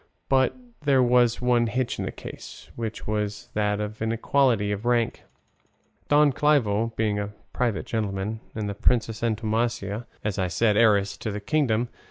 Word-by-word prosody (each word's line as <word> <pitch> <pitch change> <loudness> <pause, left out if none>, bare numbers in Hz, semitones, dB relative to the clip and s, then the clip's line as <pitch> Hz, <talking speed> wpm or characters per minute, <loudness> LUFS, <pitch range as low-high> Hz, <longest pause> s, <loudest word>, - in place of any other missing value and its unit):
But 130 - +3 0.2
there 140 -3 +4
was 120 -1 +3
one 120 -1 +3
hitch 125 +3 -2
in - - -2
this - - -5
case, - - -10
which 110 -2 -5
was 105 -1 -3
that 105 -1 0
of 105 +1 -5
inequality 115 -1 +2
of 105 +1 -3
rank, 120 -1 +1 0.9
Don 145 -1 +5
Clavijo 115 -7 +2
being 105 -2 0
a 100 - -2 0.3
private 120 -5 -1
gentleman, 105 -1 -2 0.2
and 110 -1 -2
the 100 - -2
Princess 110 +1 +1
Antonomasia, 115 -1 -1 0.2
as 105 -3 -2
I 95 - +1
said, 105 +4 +2
heiress 100 -3 +3
to - - -4
the 105 0 -3
kingdom. 120 -1 +1
110 Hz, 160 wpm, -25 LUFS, 105-120 Hz, 0.9 s, Don